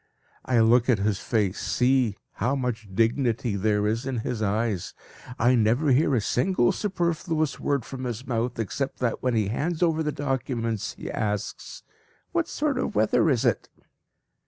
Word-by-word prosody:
I 120 -3 +3
look 120 +3 +4
at 120 - +5
his 100 0 0
face; 105 -4 0
see! 125 -4 +1
how 130 +4 -1
much 120 -5 -3
dignity 115 +1 +1
there 105 +1 +1
is 115 +5 -1
in 125 -4 -2
his 125 -4 -2
eyes. 105 -2 -1 0.4
I 120 +3 +4
never 120 +5 +3
hear 135 +1 +3
a 115 - +2
single 125 - +2
superfluous 170 -5 -1
word 140 -4 -1
from 130 -1 -6
his 120 +1 -4
mouth, 120 0 -2
except 130 +5 -3
that 120 -3 -1
when 125 -2 0
he 105 -3 +1
hands 160 - -1
over 160 -2 +2
the 150 -1 0
documents, 125 -6 -2
he - - -7
asks 105 -1 -4 0.5
"What 340 -1 0
sort 290 -3 -1
of - - -2
weather 110 +9 +3
is 125 -5 +1
it?" - - +1
120 Hz, 165 wpm, -26 LUFS, 110-140 Hz, 0.5 s, at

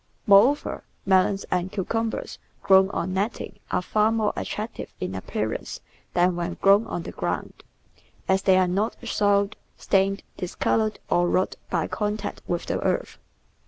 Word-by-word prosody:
Moreover, 230 +7 +4 0.2
melons 195 +1 +3
and 180 +1 0
cucumbers 225 +3 -3 0.2
grown 190 0 +6
on 185 -2 -2
netting 200 +5 -3
are 180 - 0
far 215 +3 +2
more 220 -2 +1
attractive 215 +2 -5
in 90 - -3
appearance 105 +3 -4 0.4
than 180 0 +3
when 175 0 -3
grown 200 +3 +4
on 175 - -4
the - - -6
ground, - - -4 0.6
as 190 0 +3
they 190 -1 +4
are 185 -1 +4
not 200 +5 0
soiled, 205 -1 +2 0.2
stained, 195 0 +1
discoloured, 215 +4 0
or 175 0 +3
rotted 185 +2 0
by 165 -3 0
contact 210 0 -3
with 175 -1 -2
the - - -1
earth. - - -1
195 Hz, 145 wpm, -25 LUFS, 180-210 Hz, 0.6 s, grown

